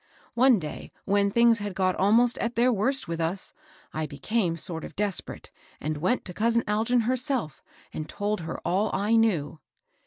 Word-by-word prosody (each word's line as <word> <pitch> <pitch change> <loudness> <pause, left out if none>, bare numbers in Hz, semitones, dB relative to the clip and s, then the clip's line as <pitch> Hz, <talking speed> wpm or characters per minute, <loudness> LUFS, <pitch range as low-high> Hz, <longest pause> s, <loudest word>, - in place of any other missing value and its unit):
One 250 0 +5
day 155 -5 -7
when 200 0 +2
things 235 +1 +4
had 205 -2 -5
got 185 0 +1
almost 230 +5 +3
at 235 0 -2
their 245 +2 +3
worst 260 +6 0
with 165 0 -3
us, 175 +4 -2 0.4
I 155 0 -2
became 170 +5 -1
sort 165 0 -4
of - - -9
desperate, 205 -2 -3 0.3
and 155 +1 -3
went 185 +11 0
to 180 - -7
cousin 230 +3 +2
Algin 225 +3 +2
herself, 255 - -1 0.3
and 155 0 -5
told 210 +1 -2
her 165 0 -5
all 200 +4 +1
I 205 +4 +2
knew." 175 -10 +1
205 Hz, 175 wpm, -26 LUFS, 170-235 Hz, 0.4 s, One